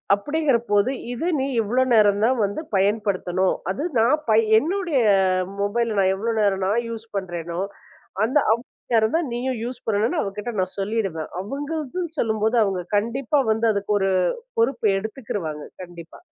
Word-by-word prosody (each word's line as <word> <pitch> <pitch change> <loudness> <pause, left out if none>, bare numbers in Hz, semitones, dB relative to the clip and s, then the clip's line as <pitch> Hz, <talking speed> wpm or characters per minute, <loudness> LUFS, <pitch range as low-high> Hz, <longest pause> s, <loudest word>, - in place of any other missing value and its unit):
அப்படிங்கிறபோது, 235 -3 +1 0.2
இது 285 +8 -3
நீ 265 - 0
இவ்வளவு 250 +4 +1
நேரம் 205 -2 +4
தான் 255 +2 +2
வந்து 200 +10 -4
பயன்படுத்தணும். 190 -2 +1 0.2
அது 195 - -3 0.2
நான் 235 +6 +4
பய 220 0 +6 0.2
என்னுடைய 335 - 0 0.6
மொபைல் 225 +3 0
நான் 190 -1 +3
எவ்வளவு 225 +3 -1
நேரம் 195 -2 +1
நான் 230 +4 +1
யூஸ் 225 0 -7
பண்றேனோ, 175 -3 -4 0.7
அந்த 255 +6 +1 0.2
அவ்வளவு 235 +3 -4 0.3
நேரம் 220 +4 +3
தான் 330 -5 -2
நீயும் 250 0 -2
யூஸ் 245 +1 -6
பண்ணணும்னு 225 +9 +1
அவக்கிட்ட 210 +4 -4
நான் 185 0 -2
சொல்லிடுவேன். 195 -6 -2
அவங்களுக்கு 290 - -4 0.2
சொல்லும்போது, 220 +1 +1
அவங்க 190 -3 -1
கண்டிப்பா 240 +6 0
வந்து 225 +1 +1
அதுக்கு 200 +1 -1
ஒரு 195 0 +1 0.5
பொறுப்பு 275 - +2
எடுத்துக்கிருவாங்க, 195 - -5 0.2
கண்டிப்பா. 170 -2 -11
220 Hz, 145 wpm, -23 LUFS, 195-250 Hz, 0.7 s, பய